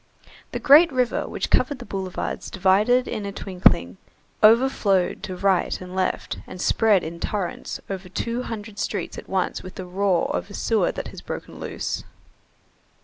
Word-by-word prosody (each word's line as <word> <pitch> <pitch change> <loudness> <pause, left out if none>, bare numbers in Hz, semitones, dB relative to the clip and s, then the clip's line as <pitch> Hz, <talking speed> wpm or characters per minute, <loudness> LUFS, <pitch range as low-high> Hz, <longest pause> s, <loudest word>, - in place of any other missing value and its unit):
The - - -2
great 295 +4 +7
river 250 -2 0
which - - -4
covered 285 - +3
the - - -9
boulevards 190 -2 -4
divided 205 +7 +3
in 210 - -3
a 200 - -4
twinkling, 180 - +2 0.4
overflowed 215 -5 +4
to 185 - -5
right 190 0 +1
and 185 0 -9
left, 185 -1 -1
and 185 - -9
spread 210 -1 +3
in 170 +1 -6
torrents 195 -3 -3
over 190 -1 -6
two 235 +6 -2
hundred 215 -3 -7
streets 210 - -3
at - - -13
once 190 -2 -1
with 185 - -10
the 185 - -6
roar 185 0 +1
of - - -3
a 200 - -8
sewer 225 -2 +1
that - - -6
has - - -10
broken - - -7
loose. - - -4
195 Hz, 165 wpm, -24 LUFS, 185-225 Hz, 0.4 s, great